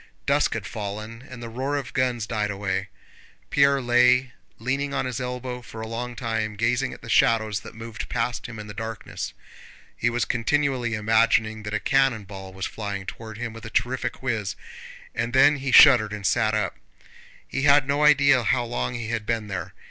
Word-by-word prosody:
Dusk - - +2
had - - -4
fallen, 110 +2 -6
and 125 -2 -9
the - - -5
roar 130 +5 -2
of 135 -5 -5
guns 125 -4 0
died 105 0 -1
away. 95 -2 -2 0.6
Pierre 140 0 +4
lay 125 0 +4 0.3
leaning 135 +4 -2
on - - 0
his 125 0 -3
elbow 125 0 -4
for 115 -2 -10
a 110 - -5
long 120 +2 -5
time, 110 -3 -2
gazing 120 +5 0
at - - -11
the - - -9
shadows 110 -3 +3
that - - -12
moved 115 0 -7
past 120 0 -2
him 120 -2 -9
in 105 - -7
the 105 - -8
darkness. 110 +1 -6 0.6
He 120 - +1
was 120 +1 0
continually 125 -1 0
imagining 110 0 +2
that 105 0 -4
a - - 0
cannon 135 -5 +2
ball 95 -1 -9
was 95 0 -5
flying 100 -3 -5
toward 110 +1 -8
him 115 -1 -4
with 115 -1 -11
a 110 - -6
terrific 125 0 -1
whizz, 110 -6 -1 0.6
and 115 +2 -2
then 145 +3 +6
he 135 -1 -3
shuddered 120 -7 +8
and 105 -2 -6
sat 110 -1 +2
up. 100 -11 -1 0.7
He 135 - -3
had 140 -1 +5
no 145 +1 +1
idea 140 -3 +6
how 120 +2 +1
long 120 +1 -3
he 115 -2 -4
had 110 -2 -3
been 110 -3 -1
there. 90 -5 -5
115 Hz, 195 wpm, -25 LUFS, 110-125 Hz, 0.7 s, shuddered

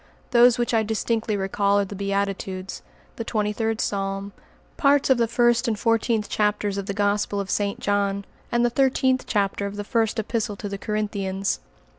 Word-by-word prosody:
Those 245 0 +6
which 240 0 0
I 225 - +4
distinctly 220 0 -1
recall 200 +1 +1
are 200 - +1
the 200 - -8
Beatitudes, 195 -1 -3 0.4
the 230 - -3
Twenty 210 -2 -1
third 225 0 -1
Psalm, 195 0 -2 0.4
parts 280 -2 +3
of 255 - +4
the 230 - +3
first 240 +1 +2
and 220 -2 0
fourteenth 230 -1 +1
chapters 210 -1 0
of 195 - -6
the 200 - -3
Gospel 205 0 0
of 195 -1 -3
St. 200 -1 -1
John, 200 -1 0 0.3
and 240 0 +3
the 240 - +1
thirteenth 260 0 +2
chapter 200 -1 0
of 200 - -7
the 205 - -4
First 225 +1 0
Epistle 220 -1 -1
to 205 - -6
the 200 0 -5
Corinthians. 200 -2 -2
210 Hz, 180 wpm, -24 LUFS, 200-230 Hz, 0.4 s, Those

